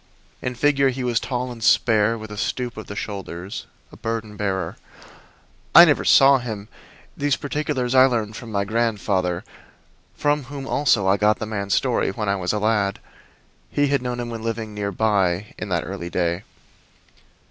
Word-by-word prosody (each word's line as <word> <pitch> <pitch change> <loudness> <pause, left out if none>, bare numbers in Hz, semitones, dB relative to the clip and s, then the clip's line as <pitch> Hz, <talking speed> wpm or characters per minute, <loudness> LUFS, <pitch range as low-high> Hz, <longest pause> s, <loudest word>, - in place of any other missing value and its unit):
In 125 0 -3
figure 140 +1 +3
he 130 0 -4
was 120 -2 +1
tall 125 -1 -3
and 115 -2 -8
spare, 110 0 +3
with 110 -1 -9
a - - -6
stoop 120 +3 -3
of 110 - -8
the 100 - -7
shoulders 95 -2 -6 0.2
a - - -13
burden 110 -2 -4
bearer. 95 -5 -2 1.0
I - - +12
never - - +2
saw 135 0 +6
him; 110 -4 -6 0.5
these 145 -1 +1
particulars 145 -4 -2
I 130 0 +7
learned 110 -4 -2
from 115 0 -8
my 100 -1 0
grandfather, 100 -5 0 0.7
from 145 -2 0
whom 140 +1 -7
also 130 -8 +2
I 95 +1 +4
got 105 +1 +3
the - - -4
man's 100 -2 -1
story - - +1
when 105 +1 -3
I 100 - +2
was 90 -2 -1
a 105 - -1
lad. 105 -2 +1 0.7
He 145 -1 +1
had 140 -2 +1
known 125 -1 -3
him 120 -1 -4
when 115 -1 -5
living 110 -1 -4
near 100 -1 -3
by 100 -2 0
in 105 - -5
that 85 -3 -1
early 95 -3 -5
day. 85 +1 -1
110 Hz, 180 wpm, -22 LUFS, 100-125 Hz, 1.0 s, I